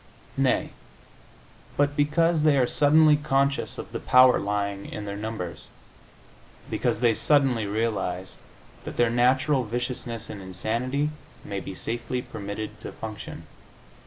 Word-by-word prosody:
Nay, -, -, +1 dB, 1.1 s
but 145 Hz, 0 st, +2 dB
because 155 Hz, +3 st, +2 dB
they 150 Hz, -2 st, +4 dB
are 130 Hz, -, +4 dB
suddenly 150 Hz, +3 st, +5 dB
conscious 140 Hz, -1 st, 0 dB
of -, -, -7 dB
the -, -, -4 dB
power 125 Hz, 0 st, +6 dB
lying 100 Hz, -1 st, -2 dB
in 105 Hz, -, -5 dB
their 100 Hz, 0 st, -4 dB
numbers 105 Hz, -4 st, -5 dB, 1.0 s
because 105 Hz, -, 0 dB
they 120 Hz, -2 st, +4 dB
suddenly 130 Hz, -3 st, +2 dB
realize 100 Hz, -4 st, -2 dB, 0.5 s
that -, -, -7 dB
their 120 Hz, -1 st, +3 dB
natural 130 Hz, +3 st, +3 dB
viciousness 120 Hz, 0 st, -4 dB
and 100 Hz, -, -8 dB
insanity 120 Hz, -, -2 dB, 0.3 s
may 100 Hz, -1 st, -3 dB
be 95 Hz, -, -7 dB
safely 120 Hz, +5 st, -3 dB
permitted 105 Hz, -1 st, -6 dB
to -, -, -7 dB
function. 110 Hz, -2 st, -8 dB
120 Hz, 130 wpm, -26 LUFS, 105-140 Hz, 1.1 s, power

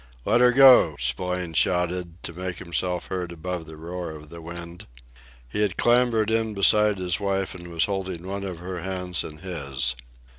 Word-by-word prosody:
"Let 115 Hz, +3 st, +3 dB
her 125 Hz, 0 st, +6 dB
go!" 125 Hz, -, +7 dB
Spillane 90 Hz, +8 st, -2 dB
shouted, 90 Hz, +1 st, 0 dB
to 85 Hz, -, -5 dB
make 90 Hz, 0 st, -4 dB
himself 90 Hz, 0 st, -2 dB
heard 90 Hz, -2 st, -3 dB
above 85 Hz, 0 st, -5 dB
the 80 Hz, -1 st, -10 dB
roar 85 Hz, +2 st, -5 dB
of 75 Hz, -1 st, -10 dB
the 85 Hz, +1 st, -10 dB
wind. 85 Hz, +1 st, -8 dB, 0.6 s
He 60 Hz, -, -2 dB
had 100 Hz, -3 st, 0 dB
clambered 120 Hz, -2 st, +3 dB
in 110 Hz, -1 st, 0 dB
beside 105 Hz, +1 st, +4 dB
his 90 Hz, 0 st, -1 dB
wife, 95 Hz, -1 st, -1 dB
and 85 Hz, -1 st, -8 dB
was 85 Hz, -1 st, +1 dB
holding 95 Hz, -3 st, -4 dB
one 100 Hz, +1 st, -4 dB
of 95 Hz, -3 st, -5 dB
her 90 Hz, +1 st, -6 dB
hands 90 Hz, -1 st, -2 dB
in 75 Hz, -, -8 dB
his. 70 Hz, -7 st, -1 dB
90 Hz, 180 wpm, -25 LUFS, 85-95 Hz, 0.6 s, go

